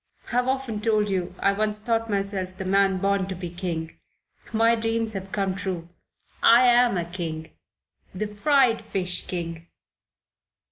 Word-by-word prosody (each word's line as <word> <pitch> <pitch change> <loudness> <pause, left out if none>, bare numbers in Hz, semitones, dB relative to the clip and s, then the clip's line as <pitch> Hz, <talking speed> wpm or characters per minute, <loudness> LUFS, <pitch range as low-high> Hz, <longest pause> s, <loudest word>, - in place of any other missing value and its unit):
I've 245 +1 +1
often 260 -5 -2
told 215 -2 +1
you 180 -1 -2
I 200 - +2
once 210 +1 0
thought 225 +1 -1
myself 195 -2 -2
the 190 - -5
man 195 0 +3
born 195 0 +1
to 190 - -4
be 175 -1 -6
king. 170 -3 -5 0.5
My 230 +1 +4
dreams 225 -1 -1
have 195 -1 -6
come 195 -2 0
true. 185 -3 -4 0.5
I 240 +2 +7
am 240 -3 +5
a 170 - -1
king. 165 -2 -5 0.6
The 190 +3 -3
fried 235 +3 +2
fish 180 -2 -2
king." 170 -2 -5
200 Hz, 150 wpm, -25 LUFS, 185-225 Hz, 0.6 s, I